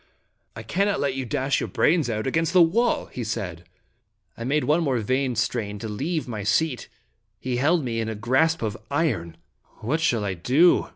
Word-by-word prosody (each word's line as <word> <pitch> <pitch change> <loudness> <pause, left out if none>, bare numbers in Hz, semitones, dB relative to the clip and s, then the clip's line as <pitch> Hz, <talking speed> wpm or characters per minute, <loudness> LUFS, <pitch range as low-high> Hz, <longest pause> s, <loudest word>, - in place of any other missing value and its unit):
" - - -47
I 110 - -7
cannot 200 - 0
let 140 -2 0
you 135 -1 -3
dash 135 +4 0
your - - -3
brains 160 -5 +2
out 110 -1 -2
against 165 +5 0
the 180 - +7
wall/* 230 +9 +1
he 125 - -6
said. 90 -6 -4 0.7
I 115 - -7
made 145 +5 +1
one 155 +4 +2
more 135 -6 +1
vain 130 +3 0
strain 110 -2 -1
to 110 - -6
leave 145 +10 -3
my 110 -4 -4
seat. 130 +6 0 0.5
He 125 -1 -2
held 155 +5 +2
me 115 -2 -2
in 110 0 -2
a 110 - -4
grasp 130 +8 +1
of 110 -2 -2
iron. 115 - -1 0.2
" - - -34
What 150 +9 -1
shall 115 -9 +1
I 95 - -1
do?" 130 - +3
130 Hz, 205 wpm, -24 LUFS, 110-160 Hz, 0.7 s, the